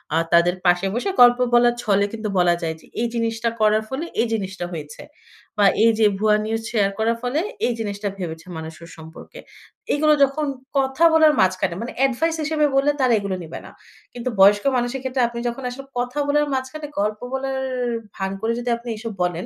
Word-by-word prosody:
আ - - +3 0.2
তাদের 175 +1 +4
পাশে 175 +1 +3
বসে 250 +11 -1
গল্প 245 0 +7
বলার 240 0 +5
ছলে 200 -1 +2
কিন্তু 220 -1 -4
বলা 175 -1 +4
যায় 160 -1 -2
যে, - - -19 0.2
এই 240 - +1
জিনিসটা 230 0 -1
করার 215 0 +3
ফলে 275 +6 -3 0.2
এই 235 - +1
জিনিসটা 190 -4 -3
হয়েছে। 150 -2 -8 0.5
বা 205 - +4 0.2
এই 230 - +6
যে 220 - +5
ভুয়া 215 0 +3
নিউজ 225 +1 -2
শেয়ার 205 -4 +1
করার 230 +1 +1
ফলে 250 +5 0 0.3
এই 245 - 0
জিনিসটা 205 -1 -3
ভেবেছে 165 -2 -6
মানুষ 160 0 -7
ওর 170 - -11
সম্পর্কে। 160 0 -12 0.5
এইগুলো 305 +1 +3
যখন 275 +3 +1 0.3
কথা 270 +3 +1
বলার 315 -1 +6
মাঝখানে, 185 -1 +1
মানে 235 - -5
এডভাইস 320 +6 0
হিসেবে 305 0 +1
বললে 275 +2 +3
তারা 255 -2 +3
এগুলো 200 -2 -3
নিবে 160 - -8
না। - - -12 0.4
কিন্তু 245 +1 -4
বয়স্ক 205 +1 +6
মানুষের 245 +2 -2
ক্ষেত্রে 260 0 -1
আপনি 235 0 -6
যখন 250 +3 -7
আসলে 270 +2 -9
কথা 250 +4 -2
বলার 295 +1 +2
মাঝখানে 265 +3 -4
গল্প 210 +1 -1
বলার 265 0 -2 0.6
ভান 190 0 -3
করে 225 +1 0
যদি 245 0 -3
আপনি 235 +1 -9
এইসব 220 +1 -6
বলেন, 175 0 -2
230 Hz, 195 wpm, -22 LUFS, 195-265 Hz, 0.6 s, গল্প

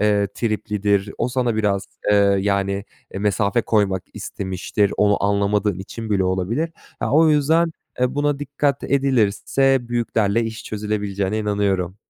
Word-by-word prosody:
eee, 105 -1 +3
triplidir. 105 -3 0
O - - 0
sana 125 -3 0
biraz, 100 -3 0 0.2
eee, 100 -1 +4
yani, 100 0 0 0.3
e, - - -6
mesafe 105 +2 +1
koymak 100 -4 +1
istemiştir, 95 +1 -2
onu 105 -1 +2
anlamadığın 100 -1 +1
için 110 +3 -7
bile 95 -2 +2
olabilir. 95 - -1 0.3
A, - - -1
o 160 +2 +5
yüzden 160 +3 +3 0.3
e, 125 +1 +1
buna 145 0 0
dikkat 145 0 -1
edilirse 135 0 +1
büyüklerle 115 -2 +1
iş 115 0 -6
çözülebileceğine 105 -1 -2
inanıyorum. 100 -3 -1
105 Hz, 135 wpm, -21 LUFS, 100-120 Hz, 0.3 s, o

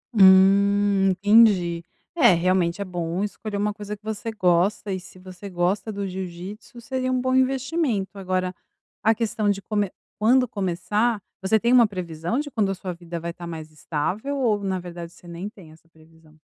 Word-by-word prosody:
Hum. 195 +1 +5
Entendi, 190 -4 +4 0.3
é 240 - +6
realmente, 175 0 +1
é - - -2
bom 175 +1 -3
escolher 210 0 -5
uma 210 +1 0
coisa 210 0 -7
que 210 - -51
você 220 +1 -4
gosta, 190 +1 +1
e 185 - -3
se 180 +1 -15
você 185 +2 -10
gosta 185 +4 -1
do 200 -1 -4
jiu-jitsu 190 +5 -7
seria 255 +1 -2
bom 255 0 0
investimento. 260 - 0
Agora 185 -1 -1 0.5
a 225 +1 +3
questão 215 -2 -1
de 200 -1 +1
come 205 -1 -1 0.3
quando 250 +4 +4
começar 205 +3 -1 0.2
você 205 +3 +2
tem 235 +3 +2
uma 240 -3 +7
previsão 175 - -3
de 295 -1 -4
quando 210 -5 0
a - - -3
sua 185 -1 -5
vida 170 0 -7
vai 170 +1 -4
estar 175 0 -9
mais 160 -2 -7
estável 180 - -3
ou 215 -6 +1
na 190 -1 -1
verdade 175 -1 -8
você 175 - -17
nem 175 +4 -6
tem 180 -7 -15
essa 165 +1 -21
previsão? 160 -1 -22
195 Hz, 180 wpm, -24 LUFS, 175-215 Hz, 0.5 s, uma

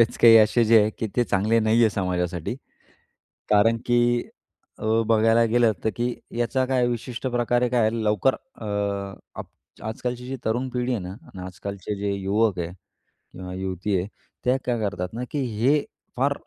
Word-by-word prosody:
बरेच 115 - +3
काही 115 -1 +8
असे 110 +2 +5
जे 115 0 +6
आहे, 105 - +1
की 110 - -1
ते 120 - +3
चांगले 105 +2 +2
नाही 110 +1 +3
आहे 110 - +5
समाजासाठी. 90 0 -2 0.9
कारण 110 +2 +4
की 120 0 +2 0.5
अ, - - -5 0.2
बघायला 115 +1 +4
गेलं 120 -2 +4
तर, - - +2
की 120 +1 0 0.2
याचा 130 +2 +1
काय 130 -1 +1
विशिष्ट 120 +1 -4
प्रकारे 120 0 +1
काय 115 -3 +3
लवकर 110 +2 +1
अ, 265 - -14 0.7
अप - - -5 0.4
आजकालची 125 +3 -4
जी 135 - -3
तरुण 120 +4 0
पिढी 125 0 -1
आहे 120 - 0
ना 90 - -6
आणि 120 - -12
आजकालचे 100 +2 -6
जे 100 0 -1
युवक 100 0 +1
आहे 85 0 -3 0.6
किंवा 90 0 -7
युवती 95 +1 -2
आहे, 90 +2 -2 0.4
त्या 125 +1 +3
काय 120 -2 0
करतात 100 -3 -3
ना, 120 +2 -4
की 150 - -2
हे 130 +4 +1 0.3
फार 140 +3 +2
115 Hz, 170 wpm, -24 LUFS, 100-120 Hz, 0.9 s, काही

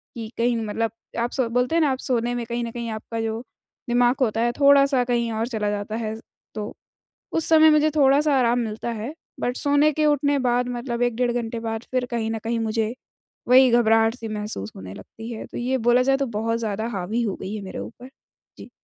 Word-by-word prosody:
कि 225 -2 -6
कहीं 235 0 +1
मतलब 225 +1 -1 0.3
आप 235 +1 -1
सो 260 -3 0
बोलते 250 +5 +1
हैं 335 - +4
ना, 300 - +3
आप 260 - -1
सोने 240 -2 -1
में 240 -1 -3
कहीं 235 +1 -3
न 230 - -4
कहीं 235 0 -5
आपका 225 +1 -5
जो 225 0 -2 0.5
दिमाग 245 +1 +3
होता 225 -3 +1
है, 240 +1 +2
थोड़ा-सा 280 -2 +5
कहीं 240 -1 0
और 225 +1 -1
चला 215 -4 -2
जाता 205 +1 -3
है। 220 -1 -3 0.4
तो 210 0 -5 0.6
उस 325 - 0
समय 315 -1 +7
मुझे 305 0 +4
थोड़ा-सा 285 +1 +4
आराम 240 -1 +3
मिलता 225 0 -3
है, 230 +6 -5 0.3
बट 245 +1 -1
सोने 290 +1 +3
के 305 +1 +1
उठने 290 -1 +2
बाद, 245 -1 +1
मतलब 240 0 -3
1 245 -2 +1
डेढ़ 245 0 +1
घंटे 235 -1 -3
बाद, 225 -1 -4
फिर 255 -1 0
कहीं 230 -2 -1
न 225 - -2
कहीं 230 +1 -1
मुझे 220 0 -1 0.5
वही 255 +1 +7
घबराहट-सी 225 0 +3
महसूस 210 - -5
होने 95 0 -8
लगती 225 - -10
है। 220 - -7
तो - - -8
ये 255 +2 0
बोला 245 +1 +5
जाए 270 +1 +3
तो 275 0 -1
बहुत 230 +1 0
ज़्यादा 220 -1 -2
हावी 200 +6 -1
हो 210 -5 -2
गई 195 - -4
है 215 - -5
मेरे 190 - -7
ऊपर। 245 +2 -9 0.5
जी। - - -11
235 Hz, 215 wpm, -23 LUFS, 225-255 Hz, 0.6 s, समय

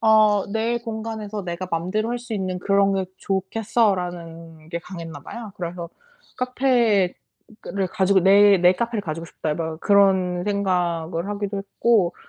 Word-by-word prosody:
어 215 -2 +5
'내 225 +2 0
공간에서 220 -2 -5
내가 175 +1 -4
마음대로 185 +7 -1
할 240 - -1
수 240 -1 -9
있는 185 -3 -2
그런 195 +1 +2
게 190 -1 0
좋겠어.'라는 180 -6 -2
게 170 - -2
강했나 165 -4 -8
봐요. 225 +5 -8
그래서 170 -1 -5 0.5
카페를 245 -7 +2 0.8
가지고 190 0 +3
'내 200 +2 +6
내 180 +1 +6
카페를 230 +2 -2
가지고 165 -1 -5
싶다.' 155 -1 -3
막 160 -1 -4
그런 190 -3 +3
생각을 180 -3 -1
하기도 205 -1 -3
했고 200 -1 +1
195 Hz, 295 characters per minute, -23 LUFS, 175-215 Hz, 0.8 s, 내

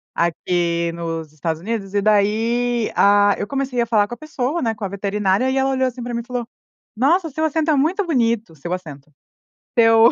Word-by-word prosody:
aqui 170 0 0
nos 165 -2 -5
Estados 160 +1 -3
Unidos 205 -1 -4
e 205 - +2
daí, 225 +3 +1
ah, 205 0 +5
eu 205 - -3
comecei 270 -2 -2
a - - +1
falar 215 -3 +2
com 240 - -7
a - - -7
pessoa, 310 +1 -3
né, 225 -3 0
com 210 - -9
a - - -1
veterinária, 200 +4 0
e 265 - 0
ela 270 0 +2
olhou 260 -1 +1
assim 250 -1 -6
pra 240 0 -5
mim 235 - -2
e - - -14
falou: 245 -2 -3 0.5
"Nossa, 325 - +2
seu 315 +3 -1
acento 315 0 +1
é - - +3
muito 340 +8 +1
bonito, 230 - 0
o - - -17
seu 170 +5 -5
acento." 150 -5 -8 0.7
Seu 225 0 +6
225 Hz, 215 wpm, -20 LUFS, 190-255 Hz, 0.7 s, Seu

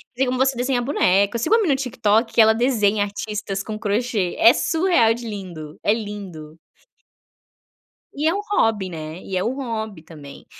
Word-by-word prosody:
tem 265 - +1
como 255 0 -1
você 265 -1 +2
desenha 245 0 0
boneco. 200 -5 +2
Eu - - -1
sigo 380 - +1
uma 460 - +3
menina 320 -9 +2
no 270 - -4
TikTok 225 -2 0
ela 220 0 +6
desenha 215 -4 +1
artistas 205 -1 -4
com 215 -1 -6
crochê. 210 -3 -1
É 230 - +8
surreal 320 -10 +2
de 235 0 -7
lindo, 170 -7 -8
é 205 - +3
lindo! 195 -8 -7 1.6
E 300 +3 -1
é 330 - +3
um 405 - -2
hobby, 210 - +1
né, 160 +1 -7
e 190 -1 -4
é 180 - 0
o 240 - -1
hobby 220 - -5
também. 150 -4 -13
220 Hz, 180 wpm, -21 LUFS, 195-250 Hz, 1.6 s, É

